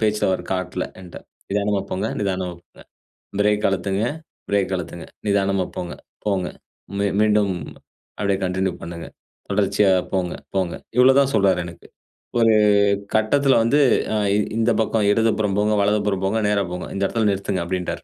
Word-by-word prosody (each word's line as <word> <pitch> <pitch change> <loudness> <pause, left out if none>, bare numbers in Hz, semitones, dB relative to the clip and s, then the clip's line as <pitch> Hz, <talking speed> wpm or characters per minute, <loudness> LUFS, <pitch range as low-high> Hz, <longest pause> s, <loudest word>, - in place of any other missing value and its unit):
பேச்சில 105 -1 +1
அவர் 95 - -1
காட்டல 95 -1 -2 0.2
என்ட்ட. 90 -2 -11 0.3
"நிதானமா 100 0 +1
போங்க. 95 +4 -1
நிதானமா 95 -3 -2
போங்க. - - -21 0.6
பிரேக் 105 0 +2
அழுத்துங்க. 95 +1 -1 0.5
பிரேக் 100 -1 +1
அழுத்துங்க. 85 -1 -6 0.2
நிதானமா 100 -2 +1
போங்க, 90 -1 -4 0.3
போங்க. 95 -4 0 0.5
மீ 100 - +2 0.2
மீண்டும் 105 -2 +3 0.7
அப்படியே 100 -2 +1
கன்டின்யூ 95 0 -1
பண்ணுங்க. 85 0 -7 0.4
தொடர்ச்சியா 100 0 +3 0.2
போங்க, 90 -2 0 0.2
போங்க." 95 -3 0 0.2
இவ்ளோ 130 +1 +6
தா 140 - +6
சொல்றாரு 95 -3 +3
எனக்கு. 85 -1 -11 0.5
ஒரு 115 -1 +5 0.6
கட்டத்தில 135 +6 +3
வந்து 140 +6 +3 0.3
"அ - - +2 0.4
இந்த 115 +1 +2
பக்கம் 110 -1 +1
இடதுபுறம் 110 -2 +1
போங்க, 105 +1 +2
வலதுபுறம் 100 -2 +1
போங்க, 105 +4 +1
நேரா 100 -1 +1
போங்க. 90 - -5
இந்த 100 - -1
இடத்தில 110 +1 0
நிறுத்துங்க" 95 -2 -2
அப்படின்ட்டார். 90 0 -3
100 Hz, 145 wpm, -22 LUFS, 95-105 Hz, 0.7 s, இவ்ளோ